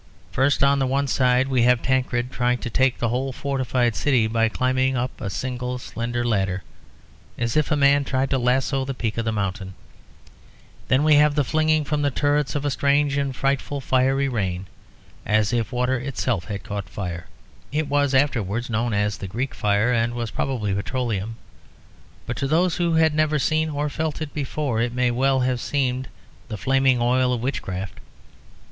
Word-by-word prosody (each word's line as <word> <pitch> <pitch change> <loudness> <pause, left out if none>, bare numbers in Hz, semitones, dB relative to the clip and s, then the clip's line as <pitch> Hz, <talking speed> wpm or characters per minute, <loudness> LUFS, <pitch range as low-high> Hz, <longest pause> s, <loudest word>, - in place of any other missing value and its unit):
First, 135 +2 +2
on 140 0 +4
the 135 - +1
one 140 +2 +1
side, 125 -1 +2
we 130 -2 +1
have 125 0 +3
Tancred 125 -1 0
trying 125 0 +1
to 120 - -5
take 130 +2 +2
the 120 - -1
whole 130 +3 -1
fortified 130 -3 -1
city 130 -6 +2
by 115 0 +1
climbing 130 +2 +1
up 125 +1 -3
a 100 - -3
single 125 +3 -3
slender 120 0 -3
ladder, 95 -5 0 0.7
as 115 -1 -1
if 155 -2 +2
a 155 - +2
man 140 0 +4
tried 130 0 -1
to 135 - +2
lasso 130 +2 +1
the 135 0 -4
peak 115 -2 -2
of 115 - -2
a - - +2
mountain. 95 -2 -3 1.1
Then 130 +3 +3
we 155 0 +5
have 150 0 +4
the 145 - +2
flinging 155 +2 +2
from 150 0 -1
the 145 - +2
turrets 145 +2 0
of 145 0 -2
a 145 - +1
strange 140 +1 +2
and 140 -2 -1
frightful 140 +1 -1
fiery 135 +1 +1
rain, 95 -7 -2 0.6
as 110 +1 +1
if 115 -3 -1
water 125 +1 0
itself 125 -7 -2
had 105 -2 -5
caught 100 -3 -5
fire. 85 -4 -5 0.4
It 155 +1 -1
was 145 -1 +1
afterwards 120 -4 0
known 115 0 0
as 105 -1 0
the 95 - -5
Greek 125 +8 -3
Fire 105 +4 +1
and 115 0 0
was 115 -2 -3
probably 110 -7 -2
petroleum; 110 0 -2 0.9
but 120 - -4
to 135 - -1
those 165 +4 +2
who 170 -1 +1
had 160 -1 +4
never 155 0 +2
seen 155 +2 +1
(or 145 0 -2
felt) 155 +1 -3
it 155 -2 -5
before 140 -4 -2
it 120 0 -1
may 125 -1 +1
well 130 +2 +2
have 125 -1 0
seemed 130 -2 -1 0.4
the 110 - -5
flaming 130 +4 +2
oil 125 +1 +2
of 120 -2 -1
witchcraft. 95 -8 -4
130 Hz, 185 wpm, -23 LUFS, 115-140 Hz, 1.1 s, we